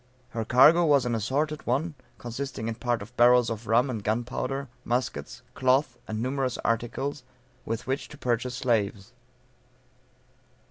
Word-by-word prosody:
Her 115 -1 -3
cargo 150 +9 +6
was 145 -5 +4
an 120 - 0
assorted 145 +8 -1
one, 145 +7 0 0.2
consisting 120 -1 -5
in 115 - -1
part 120 +1 -1
of 125 - -15
barrels 120 0 +5
of 110 0 -6
rum, 115 +4 +4
and 115 -6 -4
gunpowder, 125 +5 -2 0.2
muskets, 125 +2 -3
cloth, 130 0 +2
and 110 0 -3
numerous 130 -1 -1
articles, 125 +5 -1 0.4
with 115 0 -3
which 135 +2 -2
to 150 - -12
purchase 125 0 -1
slaves. 105 -5 -1
125 Hz, 140 wpm, -27 LUFS, 115-135 Hz, 0.4 s, cargo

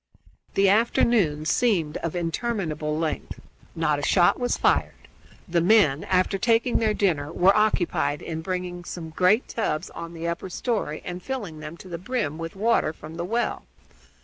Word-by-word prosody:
The 195 0 +4
afternoon 200 -7 +3
seemed 170 -6 +1
of 165 +1 -4
interminable 165 -4 -2
length. 160 -1 -3 0.4
Not 150 -3 +1
a - - -4
shot 175 - +3
was 245 0 0
fired. - - +2 0.5
The 170 -1 +1
men, 175 -7 +4
after 185 +1 +1
taking 230 +2 +2
their 215 -2 +1
dinner, 155 -7 0
were 185 +3 +4
occupied 195 -8 +1
in 160 -1 -4
bringing 180 0 -4
some 165 -2 -7
great 185 +8 +3
tubs 170 -7 -2
on 170 0 -8
to 165 - -10
the 170 - -3
upper 170 +2 -3
story 200 -6 -2
and 180 0 -5
filling 205 -12 -5
them 155 +2 -8
to 185 - -12
the 170 -2 -6
brim 185 - -2
with 165 +2 -6
water 215 -5 +2
from 155 0 -11
the 170 - -3
well. 235 +5 -2
175 Hz, 170 wpm, -25 LUFS, 160-210 Hz, 0.5 s, The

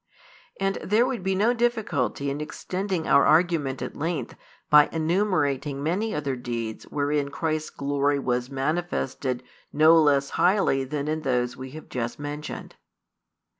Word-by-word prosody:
And 195 0 0
there 220 +5 +3
would 255 -4 -2
be 190 +1 0
no 215 +5 +3
difficulty 210 - 0
in 145 +2 -4
extending 185 +2 -3
our - - +6
argument 155 -5 +2
at - - -6
length 155 -5 -3 0.3
by 150 -1 +6
enumerating 155 -5 0
many 195 +8 0
other 140 -3 -2
deeds 120 -3 -5
wherein 145 0 -1
Christ's 155 +1 -2
glory 140 0 0
was 125 -2 -1
manifested 135 -3 -2 0.3
no 155 +2 +6
less 140 -2 +2
highly 180 -8 +2
than 145 +1 -3
in 155 +1 -1
those 125 -3 0
we 130 +1 -8
have 155 - -11
just 120 -1 -4
mentioned. 145 +1 -6
150 Hz, 140 wpm, -25 LUFS, 135-175 Hz, 0.3 s, our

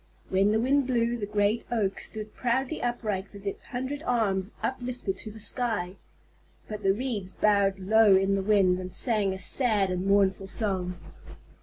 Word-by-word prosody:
When 195 +2 +3
the 220 - +2
wind 270 +3 +2
blew, 235 -2 +1
the 210 -4 -4
great 210 +2 +1
Oak 200 -5 0
stood 215 -1 -6
proudly 260 +5 -1
upright 215 -5 -2
with 200 -1 -12
its 200 - -4
hundred 260 +4 -4
arms 200 - 0
uplifted 250 -6 -3
to 220 - -6
the 215 +1 -11
sky. 210 -4 -1 0.7
But 210 -1 -6
the 195 -1 +3
Reeds 205 -4 -3
bowed 200 -1 +2
low 205 +1 +5
in 195 +1 +2
the 195 - +1
wind 190 -3 +3
and 185 0 -6
sang 210 -2 +2
a 190 - -4
sad 205 -1 +1
and 180 +1 -2
mournful 195 -1 +2
song. 190 -3 -2
205 Hz, 170 wpm, -27 LUFS, 195-235 Hz, 0.7 s, low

